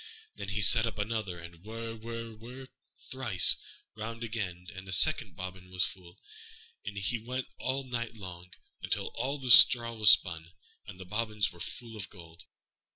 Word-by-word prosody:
Then 100 - -7
he 105 +1 -2
set 115 +2 +8
up 115 - -6
another, 105 -3 -4
and 85 0 -13
whir, 115 +2 -7
whir, 115 0 -8
whir, 125 +4 -12 0.4
thrice 120 -9 +4 0.4
round 115 +2 -7
again, 95 -6 -5
and 95 +1 -10
a - - -8
second 95 - +3
bobbin 90 0 -9
was 90 0 0
full; 90 -2 -10 0.7
and 100 - -8
so 100 +2 -2
he 120 -2 -1
went 125 +3 -5
all 135 +1 -2
night 120 -3 -5
long, 90 -4 -11 0.3
until - - -3
all 140 +3 -3
the 130 -3 -2
straw 115 0 +7
was 110 -2 +5
spun, 85 -3 +3 0.3
and 90 - -11
the 95 - -9
bobbins 105 +1 -2
were 85 - -17
full 115 +5 -8
of 100 -3 -7
gold. 85 -4 -15
110 Hz, 175 wpm, -29 LUFS, 90-115 Hz, 0.7 s, set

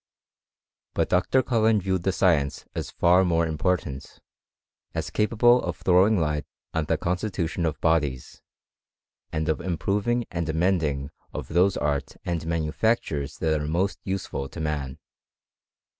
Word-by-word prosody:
But - - +1
Dr. 95 +9 +3
Cullen 110 -3 +3
viewed 95 -1 -1
the 95 - +1
science 80 -7 +1
as - - -4
far 90 +2 +4
more 85 -2 +2
important; 80 -3 -2 0.8
as - - -3
capable 120 +3 +4
of - - -4
throwing 95 +3 +4
light 75 -2 -1 0.3
on 80 -1 0
the - - +1
constitution 90 -2 -1
of 75 - -3
bodies, 75 -6 0 0.9
and 80 +1 -2
of 80 -2 0
improving 105 +7 0
and 85 -2 -2
amending 80 -4 0 0.2
of - - -5
those 90 +3 +3
arts 75 -1 -2
and 85 -2 -2
manufactures 80 - -1
|that 80 -2 0
are 75 - -3
most, 90 +5 -1
usefal 95 -8 -3
to - - -7
man. 75 -4 -3
85 Hz, 135 wpm, -25 LUFS, 75-95 Hz, 0.9 s, far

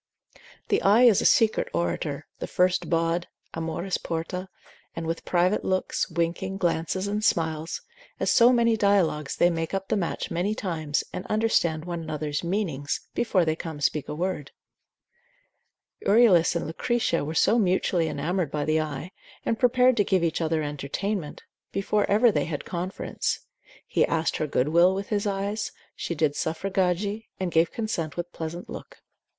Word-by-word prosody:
The - - +2
eye 210 +5 +5
is 230 -6 +6
a - - -2
secret 220 -1 +3
orator, 85 0 -2
the - - -4
first 180 0 +1
bawd, 165 +1 +1 0.3
Amoris 165 +3 -2
porta, 170 +3 -4 0.5
and 165 - -4
with 165 +1 -3
private 180 +3 +2
looks, 185 0 -1
winking, 170 +3 -2
glances 175 +1 0
and 210 +1 -2
smiles, 160 -3 0 0.4
as - - +1
so 240 0 +6
many 230 -2 +3
dialogues 190 -9 +2
they 175 - +4
make 165 +2 -2
up 195 0 -4
the - - +2
match 180 -5 -2
many 185 +5 0
times, 155 -8 -2
and 185 - -4
understand 175 -8 +1
one 170 -1 -4
another's 155 -1 -3
meanings, 170 -7 -2
before 190 -7 +2
they 155 0 +1
come 160 -2 -6
to 145 - -7
speak 150 0 0
a - - -3
word. 170 -4 -2 1.5
Euryalus 200 -7 +5
and 170 - -1
Lucretia 170 +2 0
were 155 +3 -4
so 225 +8 +4
mutually 180 -3 +2
enamoured 160 +3 -1
by 150 0 -2
the 155 0 +2
eye, 155 +3 -5 0.3
and 225 - 0
prepared 250 0 +4
to 205 - +4
give 190 -3 +1
each 165 0 0
other 160 -1 0
entertainment, 150 +5 -4 0.3
before 205 +1 0
ever 220 +3 +5
they - - 0
had 155 -4 -4
conference: 180 +2 -3 0.4
he - - +2
asked 165 0 0
her 155 - -1
good 140 0 +1
will 175 +4 +5
with 195 +1 -4
his 205 -1 0
eyes; 200 +2 -2 0.2
she 170 - -4
did 150 -2 +1
suffragari, 190 +5 -1
and 185 -2 -2
gave 165 0 +3
consent 195 -10 -3
with 175 - -1
a 175 - -27
pleasant 165 +2 -5
look. - - -10
175 Hz, 165 wpm, -26 LUFS, 160-200 Hz, 1.5 s, is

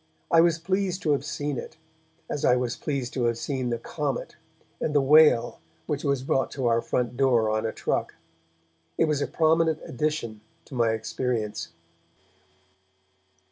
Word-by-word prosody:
I 165 - +7
was 170 -1 +3
pleased 185 +2 -1
to 155 - +2
have 140 -2 +1
seen 145 -2 -3
it, - - -9 0.5
as 145 - -4
I 125 - +5
was 125 -1 -1
pleased 135 -4 -3
to 125 -3 0
have 115 -1 +1
seen 130 -1 -2
the 120 - -1
comet, 140 +2 -4 0.4
and 150 - -2
the - - +6
whale 135 -4 +5 0.3
which 145 - -3
was 140 -3 0
brought 135 0 +1
to 135 -3 -3
our 115 0 +3
front 125 0 -1
door 120 -5 +3
on 110 +1 0
a - - -2
truck. - - -2 0.8
It - - +4
was 150 -2 0
a - - 0
prominent 160 0 +2
addition 125 -6 -3 0.2
to - - -13
my 120 -2 +2
experience. 110 -3 -2
135 Hz, 165 wpm, -26 LUFS, 120-150 Hz, 0.8 s, I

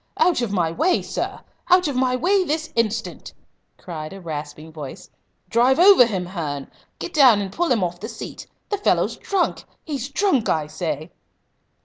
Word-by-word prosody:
"Out 350 -8 +3
of 235 -4 -2
my 175 -5 +1
way, 345 - +1
sir! - - -4 0.3
Out 360 -1 +5
of 285 - -2
my 255 0 +2
way 375 +9 +2
this 315 -1 -3
instant!" 230 0 -2 0.4
cried 155 -2 -7
a 195 - -9
rasping 155 -2 -7
voice. 150 -4 -9 0.4
"Drive 245 +4 +3
over 355 -8 +7
him, 190 -5 -3
Hearn! 155 -6 -5 0.3
Get 350 - -6
down 260 -8 +6
and 195 -2 -4
pull 345 0 0
him 225 -6 +2
off 175 0 -3
the 220 +5 -6
seat. 225 - -8 0.2
The 410 - -1
fellow's - - +1
drunk 385 -3 -1 0.2
he's 280 -4 -4
drunk 285 - +1
I 155 -2 +1
say!" 155 0 -4
230 Hz, 170 wpm, -22 LUFS, -, 0.4 s, over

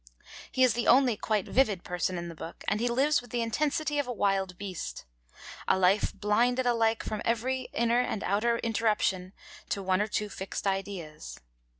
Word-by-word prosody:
He 260 - +2
is 250 -3 +5
the 235 +1 -1
only 255 -2 +5
quite 210 -1 -1
vivid 215 -9 +2
person 180 +1 -2
in 170 0 -4
the 170 - -7
book, 165 +1 -9
and 210 - +1
he 240 - +1
lives 270 +5 +2
with 245 - -15
the 235 0 -1
intensity 295 +5 0
of 285 - -1
a - - -2
wild 195 -5 0
beast, 195 -4 -6 0.6
a - - +3
life 190 +2 +3
'blinded 245 +5 +1
alike' 230 -2 +2
from 215 -1 -4
every 250 +3 -1
inner 235 +1 +2
and 220 -4 -3
outer 230 +4 +1
interruption 210 -5 0 0.4
to 200 - -2
one 185 +1 +2
or 210 - 0
two 210 0 -1
fixed 195 -1 -6
ideas. 195 -6 -4
215 Hz, 185 wpm, -29 LUFS, 195-245 Hz, 0.6 s, is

